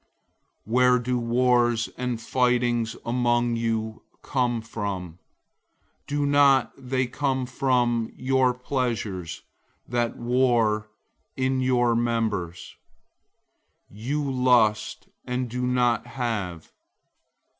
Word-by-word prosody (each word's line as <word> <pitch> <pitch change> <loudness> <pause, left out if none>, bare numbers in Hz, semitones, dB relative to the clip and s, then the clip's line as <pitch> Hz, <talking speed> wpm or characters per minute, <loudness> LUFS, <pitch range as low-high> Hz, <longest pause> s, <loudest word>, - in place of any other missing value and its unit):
004:001 110 - -6
Where 125 0 +5
do 125 0 -1
wars 120 -1 +2
and 125 -2 -3
fightings 120 -2 +1
among 120 0 +1
you 110 -1 -2 0.2
come 125 -3 0
from? 95 -6 -5 0.9
Don't 145 -1 +3
they 130 -1 -1
come 130 +1 -1
from 125 -3 0
your 130 -1 +1
pleasures 115 -9 -3 0.4
that 120 -1 -1
war 120 -3 +1 0.5
in 130 0 0
your 120 -2 +2
members? 110 -7 -2 1.2
004:002 105 - -14
You 140 +4 -2
lust, 120 -5 +2 0.2
and 125 0 -2
don't 125 -1 +1
have. 105 -10 -4
120 Hz, 90 wpm, -25 LUFS, 115-125 Hz, 1.2 s, Where